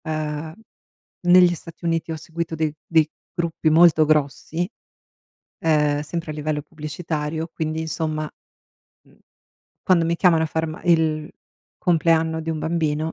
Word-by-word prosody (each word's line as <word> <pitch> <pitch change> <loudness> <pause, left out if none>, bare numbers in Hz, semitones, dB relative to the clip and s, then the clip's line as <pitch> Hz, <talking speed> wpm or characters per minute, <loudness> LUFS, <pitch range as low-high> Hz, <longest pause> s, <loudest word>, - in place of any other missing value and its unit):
Uhm, 155 0 -3 0.7
negli 180 0 +7
Stati 165 +1 -13
Uniti 165 -1 0
ho - - -2
seguito 160 +1 -5
dei 155 -1 -1
dei 160 -2 +3 0.2
gruppi 170 -2 0
molto 160 -1 +6
grossi, 155 +3 0 0.9
ehm, 150 -2 +2
sempre 165 +2 -4
a - - -5
livello 150 0 -2
pubblicitario, 155 +1 -4
quindi 160 0 -2
insomma, 155 -1 -3 0.7
mhmm, - - -25 0.7
quando 175 -3 +3
mi 170 +1 0
chiamano 165 -3 +4
a - - -1
far 160 +1 -1
ma 155 0 -7
il 160 -2 +2 0.5
compleanno 165 -1 +2
di 160 - -7
un 160 - -2
bambino 160 -1 -1
160 Hz, 135 wpm, -22 LUFS, 155-165 Hz, 0.9 s, negli